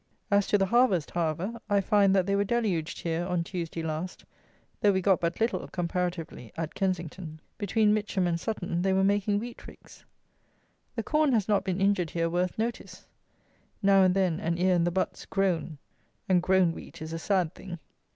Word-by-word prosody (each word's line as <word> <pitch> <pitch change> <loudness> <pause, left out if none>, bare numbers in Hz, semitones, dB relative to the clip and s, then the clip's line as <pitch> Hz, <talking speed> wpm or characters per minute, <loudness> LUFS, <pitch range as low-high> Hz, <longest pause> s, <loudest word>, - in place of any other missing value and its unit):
As 200 0 +3
to 205 - +3
the 195 - +2
harvest, 200 - +2
however, 175 +7 -2
I 205 -1 +4
find 200 -1 +3
that 190 -2 +3
they 200 +1 +1
were 200 - +2
deluged 205 -8 -1
here 165 0 -1
on 175 -1 -1
Tuesday 170 -2 -5
last, 160 +3 -4 0.6
though 205 - +5
we 190 - +1
got 190 0 +2
but 170 0 -1
little, 225 +2 0
comparatively, 175 - -3
at 165 -1 -3
Kensington. 180 -4 -3 0.2
Between 210 +1 +2
Mitcham 205 -3 0
and 170 -1 0
Sutton 175 -4 -2
they 190 +1 +2
were 190 0 +3
making 205 +1 +2
wheat 235 +3 -7
ricks. - - -15 0.9
The - - -2
corn 305 -3 +2
has 215 -5 +2
not 210 -2 +2
been 185 0 -2
injured 195 -4 +2
here 165 0 -1
worth 180 +1 -1
notice. 230 +2 -4 0.8
Now 195 0 +6
and 185 -1 +4
then 185 -4 +1
an 170 +1 -1
ear 185 +1 +3
in 170 -1 +2
the - - +2
butts 185 +2 -2
grown; 180 -5 0 0.5
and 185 -2 +4
grown 185 -1 +3
wheat 165 - -11
is 160 0 -6
a 165 - -3
sad 180 -2 0
thing! 175 -2 -8
185 Hz, 190 wpm, -28 LUFS, 170-200 Hz, 0.9 s, Now